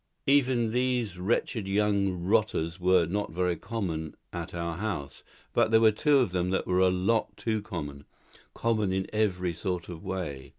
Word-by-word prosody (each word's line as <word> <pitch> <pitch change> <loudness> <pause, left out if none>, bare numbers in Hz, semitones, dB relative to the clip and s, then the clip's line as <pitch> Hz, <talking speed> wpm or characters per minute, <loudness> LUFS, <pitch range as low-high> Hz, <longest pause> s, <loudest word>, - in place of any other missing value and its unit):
Even 130 -5 +3
these 125 -6 0
wretched 105 +2 0
young 100 -3 +1
rotters 95 -4 +1
were 90 -1 +4
not 100 +5 -2
very 90 +1 0
common 85 -7 -4 0.2
at 85 -1 -5
our 85 -1 -3
house; 95 -9 -4 0.3
but - - +3
there 110 0 +5
were 110 -1 +6
two 145 +7 +3
of 125 -8 +2
them 90 0 0
that 95 - 0
were 90 0 +1
a 95 0 +5
lot 95 +5 0
too 110 -2 -1
common 75 -8 -6 0.5
common 110 -4 +1
in 95 0 0
every 90 -5 0
sort 90 +1 -3
of 85 0 -8
way. 90 -9 -4
95 Hz, 170 wpm, -28 LUFS, 85-110 Hz, 0.5 s, were